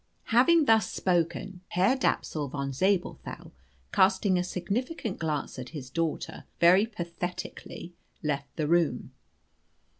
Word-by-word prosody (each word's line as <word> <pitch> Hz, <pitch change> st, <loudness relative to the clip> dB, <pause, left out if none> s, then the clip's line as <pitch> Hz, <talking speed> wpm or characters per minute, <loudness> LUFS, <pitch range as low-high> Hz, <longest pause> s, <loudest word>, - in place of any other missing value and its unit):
Having 300 Hz, +7 st, +6 dB
thus 220 Hz, -6 st, +4 dB
spoken, 180 Hz, +1 st, -1 dB
Herr 190 Hz, +9 st, +3 dB
Dapsul 155 Hz, -, 0 dB
von 140 Hz, 0 st, -3 dB
Zabelthau, 190 Hz, +6 st, -1 dB, 0.4 s
casting 190 Hz, -1 st, +3 dB
a -, -, +1 dB
significant 205 Hz, -, -3 dB
glance 155 Hz, -4 st, -2 dB
at 125 Hz, -, -6 dB
his 130 Hz, -2 st, -8 dB
daughter, 165 Hz, -1 st, -3 dB
very 185 Hz, +5 st, +6 dB
pathetically 175 Hz, -2 st, -6 dB, 0.3 s
left 140 Hz, -2 st, -2 dB
the 155 Hz, -2 st, -1 dB
room. 170 Hz, 0 st, +1 dB
180 Hz, 115 wpm, -28 LUFS, 155-200 Hz, 0.4 s, Having